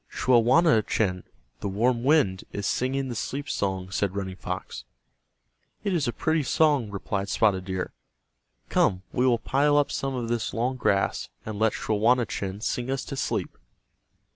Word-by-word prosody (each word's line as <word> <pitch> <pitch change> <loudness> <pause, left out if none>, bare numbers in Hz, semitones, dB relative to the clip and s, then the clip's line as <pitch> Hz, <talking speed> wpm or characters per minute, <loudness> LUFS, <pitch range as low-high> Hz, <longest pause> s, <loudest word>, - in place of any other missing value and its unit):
"Schawanachen, 115 - +3 0.3
the 100 - -3
warm 120 +4 +1
wind, 130 -10 +3
is 100 - -4
singing 135 +2 0
the 125 - -4
sleep 140 +5 -4
song," 95 -2 -2
said 100 -1 -1
Running 95 -2 -3
Fox. 90 -9 -6 1.0
"It 200 -2 0
is 155 -7 +1
a - - +1
pretty 160 +7 0
song," 145 -4 +2
replied 100 0 -3
Spotted 95 -4 +2
Deer. 95 -1 -3 0.7
"Come, 90 0 +2
we 125 +1 +2
will 120 -2 +4
pile 145 +5 +2
up 145 - +2
some 135 -1 -2
of 120 -2 -3
this 115 -2 -2
long 125 +3 0
grass, 100 -6 0 0.2
and 110 -1 -5
let 110 0 +3
Schawanachen 110 -3 0
sing 120 +2 -2
us 135 -1 -2
to - - -5
sleep." - - -2
115 Hz, 155 wpm, -26 LUFS, 100-130 Hz, 1.0 s, will